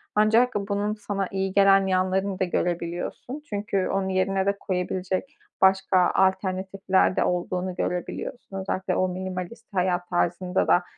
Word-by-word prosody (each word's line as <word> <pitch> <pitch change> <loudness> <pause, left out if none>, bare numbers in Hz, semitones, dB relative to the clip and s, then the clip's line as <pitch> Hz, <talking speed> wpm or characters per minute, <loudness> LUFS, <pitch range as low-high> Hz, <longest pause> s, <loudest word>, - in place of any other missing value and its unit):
Ancak 225 +4 +4
bunun 205 +1 -1
sana 200 -2 -3
iyi 190 0 -2
gelen 195 -1 +5
yanlarını 190 +1 0
da - - +2
görebiliyorsun. 175 - -3
Çünkü 200 -2 -1
onun 195 0 -1
yerine 190 0 +1
de 200 0 +1
koyabilecek 185 - -3 0.2
başka 190 -1 +4
alternatifler 190 0 +1
de - - +2
olduğunu 180 +1 -1
görebiliyorsun. 190 +4 -4
Özellikle 190 -1 -2
o 185 - +2
minimalist 185 +4 -6
hayat 180 -1 0
tarzında 180 +1 0
da 175 - +4
190 Hz, 130 wpm, -25 LUFS, 185-200 Hz, 0.2 s, gelen